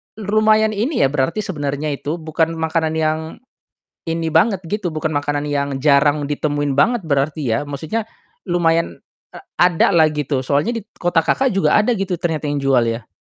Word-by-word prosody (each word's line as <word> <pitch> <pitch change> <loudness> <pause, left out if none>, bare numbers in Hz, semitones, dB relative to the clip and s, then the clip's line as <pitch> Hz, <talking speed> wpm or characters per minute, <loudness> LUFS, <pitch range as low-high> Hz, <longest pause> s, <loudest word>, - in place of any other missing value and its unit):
lumayan 215 +1 +2
ini 230 +7 -1
ya 135 - +3
berarti 150 +9 -1
sebenarnya 150 -5 -3
itu, 145 +3 -3
bukan 160 0 -1
makanan 160 0 -1
yang 155 0 +1 0.9
ini 165 0 -2
banget 190 +5 +2
gitu, 205 -3 -2
bukan 155 0 -2
makanan 145 0 -1
yang 140 -1 -1
jarang 145 0 +3
ditemuin 145 -1 -1
banget 235 +11 +3
berarti 145 +2 0 0.2
ya? - - -2
Maksudnya, 150 +10 -3 0.4
lumayan, 170 -2 0 0.3
a - - -10 0.3
adalah 160 -2 +3
gitu, 145 -3 -2
soalnya 145 - 0
di 225 - -4
t - - -55
kota 175 -2 +2
Kakak 265 +9 +2
juga 155 -6 +2
ada 225 +3 +2
gitu, 190 -3 -2
ternyata 160 -3 -2
yang 145 -1 -1
jual 135 -3 +3
ya? 115 0 -3
160 Hz, 170 wpm, -19 LUFS, 145-190 Hz, 0.9 s, ya